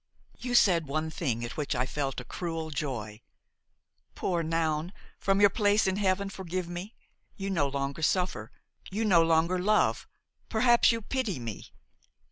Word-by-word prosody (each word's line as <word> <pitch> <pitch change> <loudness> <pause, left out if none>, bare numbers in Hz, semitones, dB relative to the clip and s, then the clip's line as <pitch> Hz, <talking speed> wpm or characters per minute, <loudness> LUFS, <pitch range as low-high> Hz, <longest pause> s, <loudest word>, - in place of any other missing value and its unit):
"You 245 -1 -2
said 170 -9 +4
one 155 +3 -2
thing 125 - -2
at 120 - -7
which 150 -4 -1
I 125 +1 +1
felt 135 0 -3
a 125 - -9
cruel 165 -2 -4
joy. 120 -8 -4 0.9
Poor 175 -3 -1
Noun! 160 +1 -1 0.3
from 195 0 +2
your 205 -1 +6
place 205 0 +3
in 190 0 +1
heaven 200 0 +1
forgive 185 -2 -4
me! 175 +5 -7 0.4
you 195 -1 -4
no 155 -7 +1
longer 140 +2 -3
suffer, 180 - 0 0.4
you 215 +4 -1
no 180 -6 +5
longer 165 +2 +2
love, 210 +4 +2 0.4
perhaps 240 +2 +5
you 230 -1 -3
pity 235 - -2
me! 115 -4 -7
170 Hz, 155 wpm, -29 LUFS, 145-195 Hz, 0.9 s, your